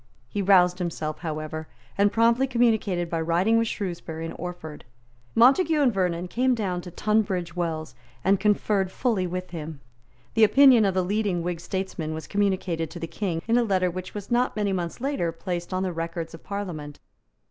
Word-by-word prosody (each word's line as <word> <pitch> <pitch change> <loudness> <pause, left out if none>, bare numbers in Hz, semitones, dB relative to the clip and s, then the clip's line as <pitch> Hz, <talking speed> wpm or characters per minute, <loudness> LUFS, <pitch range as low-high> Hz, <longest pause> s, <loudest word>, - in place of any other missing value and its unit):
He 200 - -3
roused 180 -2 +4
himself, 160 -3 -3
however, 155 -1 -5 0.3
and 200 0 +3
promptly 235 +4 +3
communicated 220 -8 +1
by 165 -1 -2
writing 180 +8 +2
with 230 - +1
Shrewsbury 170 -6 -4
and 165 - -5
Orford. 175 -3 -7 0.5
Montague 300 +7 +5
and 265 -5 +3
Vernon 180 -2 -1
came 250 +6 +1
down 185 -5 -2
to 180 - -9
Tunbridge 190 -3 0
Wells, 160 -3 -3 0.3
and 195 +1 +3
conferred 205 -2 +1
fully 215 -7 0
with 180 0 -5
him. 160 -3 -6 0.5
The 225 - +4
opinion 255 0 +7
of 195 -2 +1
the 185 - +2
leading 200 -3 0
Whig 175 -1 -3
statesmen 175 -3 -4
was 160 - -6
communicated 190 -5 0
to 175 - -8
the 165 - -3
King 170 -2 -3
in 235 +1 +4
a - - +3
letter 185 -4 +1
which 185 +3 -7
was 205 +1 -7
not 245 +1 +2
many 205 -2 0
months 175 +4 -3
later 270 -12 -1
placed 175 +1 -5
on 185 0 -1
the 185 -2 -2
records 165 0 -4
of 165 - -11
Parliament. 170 -8 -5
185 Hz, 180 wpm, -25 LUFS, 170-210 Hz, 0.5 s, opinion